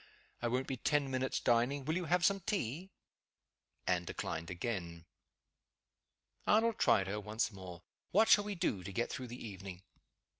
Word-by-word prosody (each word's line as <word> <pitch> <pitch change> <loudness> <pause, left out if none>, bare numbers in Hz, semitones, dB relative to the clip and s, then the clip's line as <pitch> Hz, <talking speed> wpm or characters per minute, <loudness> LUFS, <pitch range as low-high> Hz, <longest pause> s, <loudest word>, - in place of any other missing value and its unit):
"I 120 - +1
won't 125 +3 0
be 130 - -3
ten 145 +1 +1
minutes 130 0 0
dining. 125 +4 +2
Will 155 +3 0
you 180 -1 -1
have 175 0 +3
some 200 0 +3
tea?" 185 - -2 1.0
Anne 90 -1 +2
declined 85 0 -4
again. 85 -4 -4 1.4
Arnold 225 +1 +4
tried 95 - +4
her 100 +2 -2
once 110 +2 -1
more. 95 -3 -9 0.3
"What 220 +4 +5
shall 205 - +7
we 205 -1 -3
do 110 - 0
to 100 - -6
get 120 +5 -1
through 130 - -4
the 120 -1 -7
evening?" 95 -2 -8
120 Hz, 160 wpm, -35 LUFS, -, 1.4 s, shall